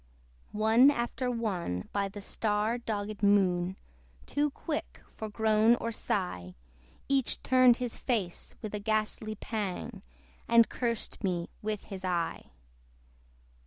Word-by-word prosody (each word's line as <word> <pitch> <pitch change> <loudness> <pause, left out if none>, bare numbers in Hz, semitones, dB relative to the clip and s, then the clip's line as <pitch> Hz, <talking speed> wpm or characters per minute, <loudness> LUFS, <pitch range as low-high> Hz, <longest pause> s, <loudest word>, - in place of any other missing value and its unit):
One 220 +5 +6
after 250 -1 -1
one, 190 - -2
by 200 -1 +1
the 205 +1 -8
star 215 +3 0
dogged 210 -2 -4
Moon 190 -3 +3 0.5
Too 295 +1 +1
quick 300 +2 -5
for 220 - -5
groan 220 +2 +4
or 230 -1 -3
sigh, 135 - -2 0.5
Each 270 -3 +1
turned 255 -2 +6
his 245 -2 -4
face 205 -9 -2
with 215 - -5
a 210 - -2
ghastly 215 +1 -1
pang, 205 0 -4 0.5
And 230 -1 +6
cursed 235 -2 -3
me 175 -3 -1
with 215 -1 -3
his 190 -2 -8
eye. 175 -2 -1
215 Hz, 125 wpm, -30 LUFS, 195-235 Hz, 0.5 s, One